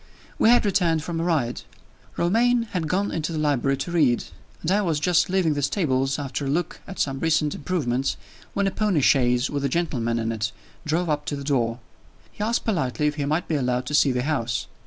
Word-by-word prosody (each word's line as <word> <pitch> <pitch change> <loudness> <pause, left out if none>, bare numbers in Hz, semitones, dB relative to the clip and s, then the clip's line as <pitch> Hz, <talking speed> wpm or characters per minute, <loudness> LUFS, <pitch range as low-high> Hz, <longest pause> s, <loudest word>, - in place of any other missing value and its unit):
We - - +5
had 240 -2 +5
returned 170 -6 +2
from 165 0 -3
a - - 0
ride. 150 -9 0 0.6
Romayne 235 +7 +3
had 170 -4 -2
gone 195 +5 0
into 160 +1 -2
the 160 - -3
library 140 -3 +1
to 135 +6 -4
read; 145 -8 +3 0.4
and 165 - 0
I 205 +2 +3
was 165 -6 0
just 175 +2 +2
leaving 180 -4 +2
the 145 - -2
stables, 135 -4 0
after 140 0 -4
a - - -2
look 170 +4 -2
at 195 - -8
some 135 -1 -1
recent 160 -2 +1
improvements, 135 -5 -1 0.4
when 200 - +1
a 195 - +1
pony 205 -8 +1
chaise 125 -2 +3
with 140 -1 -2
a 140 - +1
gentleman 125 -8 -1
in 115 0 -1
it 110 0 -2 0.4
drove 170 +3 +1
up 150 -1 -1
to 145 - -2
the 140 - -6
door. 120 -5 0 0.5
He 210 - -5
asked 230 +2 0
politely 150 - 0
if 150 - +2
he 145 - -1
might 155 +4 -1
be - - -2
allowed 125 -3 0
to 150 - -5
see 145 -2 +4
the 125 0 -1
house. 120 -7 -1
150 Hz, 220 wpm, -24 LUFS, 135-175 Hz, 0.6 s, We